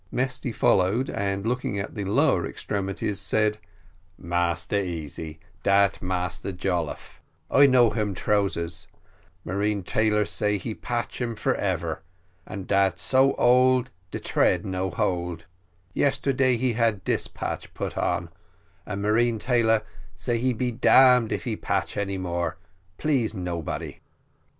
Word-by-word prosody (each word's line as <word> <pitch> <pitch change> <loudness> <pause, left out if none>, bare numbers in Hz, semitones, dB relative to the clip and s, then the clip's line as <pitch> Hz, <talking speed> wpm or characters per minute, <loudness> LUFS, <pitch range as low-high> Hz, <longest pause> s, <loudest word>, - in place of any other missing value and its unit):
Mesty 130 0 -2
followed, 105 +4 +2
and 100 0 -2
looking 120 -3 -1
at 100 - -4
the 105 - -4
lower 95 - +3
extremities 100 0 -3
said, 105 +2 +1 0.6
"Massa 85 +3 -1
Easy, 80 -2 -6 0.2
dat 100 +1 +3
Massa 90 +1 -2
Jolliffe, 90 -3 -3 0.3
I 140 +1 +7
know 125 -4 +5
him 105 -3 -1
trousers; 90 -5 -1 0.6
marine 100 +2 -1
tailor 105 +2 +1
say 105 +1 +1
he 105 +4 -5
patch 120 +2 -4
um 120 -2 -2
for - - 0
ever, 85 -5 -2 0.5
and 95 0 -7 0.3
so 135 +1 +3
old 125 +1 +4 0.2
dat - - -6
de - - -6
thread - - +2
no 95 0 -2
hold; 85 -2 -2 0.5
yesterday 135 -2 +2
he 125 0 0
had 115 -4 +1
dis - - -1
patch - - -5
put - - -4
in, - - -1 0.6
and 100 -1 -4
marine 115 +2 +2
tailor 115 -2 +2 0.3
say 115 +6 -1
he 130 +2 +1 0.2
damn 125 0 +5
if - - -2
he 115 -4 -2
patch 100 -2 -2
any 100 -1 -2
more, 85 -2 -2 0.4
please 130 -8 0
nobody." 90 -3 -4
100 Hz, 130 wpm, -25 LUFS, 95-120 Hz, 0.6 s, I